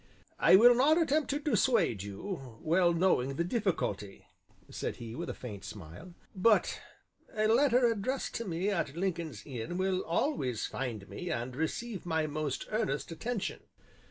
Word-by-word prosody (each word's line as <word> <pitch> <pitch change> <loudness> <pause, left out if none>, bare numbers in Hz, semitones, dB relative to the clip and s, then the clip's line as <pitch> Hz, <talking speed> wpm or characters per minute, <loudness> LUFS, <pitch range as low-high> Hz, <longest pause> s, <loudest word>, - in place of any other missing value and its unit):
"I - - +7
will 240 +5 +8
not 290 +7 +4
attempt 310 -2 +1
to 285 - 0
dissuade 230 - +2
you, 120 - -6
well 170 +2 +3
knowing 165 -7 +2
the 170 - 0
difficulty," 170 - -2 0.4
said - - -4
he, 115 -1 -8
with 170 +7 -5
a - - -2
faint 105 -6 -8
smile, 105 - -10 0.2
"but 210 +3 +3 0.5
a 215 0 +2
letter 245 +2 +4
addressed 235 +4 -1
to 230 - -4
me 185 +2 -1
at 165 -6 -2
Lincoln's 170 - -3
Inn 130 +5 -5
will 185 0 +1
always 165 - -1
find 115 -7 -4
me 175 - -6
and 125 -1 -3
receive 195 - -3
my 160 -2 +1
most 150 -2 -3
earnest 210 -10 -1
attention." 220 +5 -3
175 Hz, 155 wpm, -31 LUFS, -, 0.5 s, will